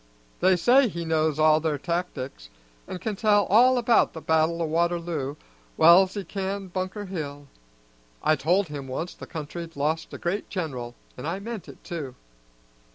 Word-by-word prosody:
They 185 +1 +4
say 250 +9 +5
he 170 -5 -5
knows 155 -2 +1
all 155 0 +5
their 155 -2 -1
tactics, 140 - -4 0.4
an' - - -5
can 205 +4 -3
tell 205 -1 +3
all 250 +4 +6
about 235 -1 +3
the 160 - -6
battle 160 +1 +2
o' - - 0
Waterloo 165 -3 -1 0.4
well's 180 +4 +6
he 200 - -3
can 195 0 -4
Bunker 185 +3 -4
Hill. 145 -6 -6 0.8
I 155 - +4
told 175 +7 +1
him 140 -2 -6
once 160 +7 -4
the - - -11
country'd 165 +1 -7
lost 155 +3 -1
a - - -7
great 185 +4 -3
general, 130 -10 -4 0.2
an' 130 - -5
I 175 +4 -2
meant 220 -1 -7
it, - - -14
too." 145 -7 -6
170 Hz, 165 wpm, -26 LUFS, 155-190 Hz, 0.8 s, all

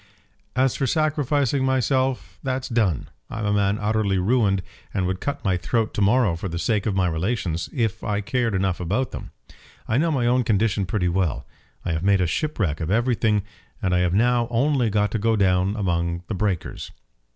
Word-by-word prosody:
"As 130 0 +2
for 135 - 0
sacrificing 145 -3 +1
myself, 130 0 0
that's 130 -1 -2
done. 110 - 0 0.2
I'm 110 -1 -4
a 105 - +1
man 100 0 +2
utterly 105 -2 +1
ruined 100 -1 +2 0.3
and 95 - +1
would 95 0 -2
cut 145 0 -4
my 95 -2 +2
throat 110 +5 -1
to - - -2
morrow 105 -2 +3
for 90 +3 -5
the 85 - -4
sake 105 +3 0
of 100 - 0
my 95 -1 +2
relations, 85 -1 -2
if 115 -6 -1
I 105 -1 -1
cared 115 0 0
enough 95 -1 0
about 105 +9 -1
them. - - -7 0.6
I 115 - +2
know 165 +2 +2
my 135 -6 +1
own 125 +1 +3
condition 105 -2 +1
pretty 90 -2 0
well. 85 -4 -1 0.4
I - - -1
have 80 -1 -1
made 100 +1 +3
a 90 - +2
shipwreck 90 - -1
of 80 - -2
everything, 110 -2 +2 0.4
and 95 -6 0
have 90 0 +2
now 120 +2 +3
only 125 0 +2
got 105 0 +1
to 115 - -1
go 115 +2 +2
down 95 0 +2
among 85 -4 -1
the 110 - -4
breakers." 95 -3 -2
105 Hz, 190 wpm, -23 LUFS, 95-125 Hz, 0.6 s, morrow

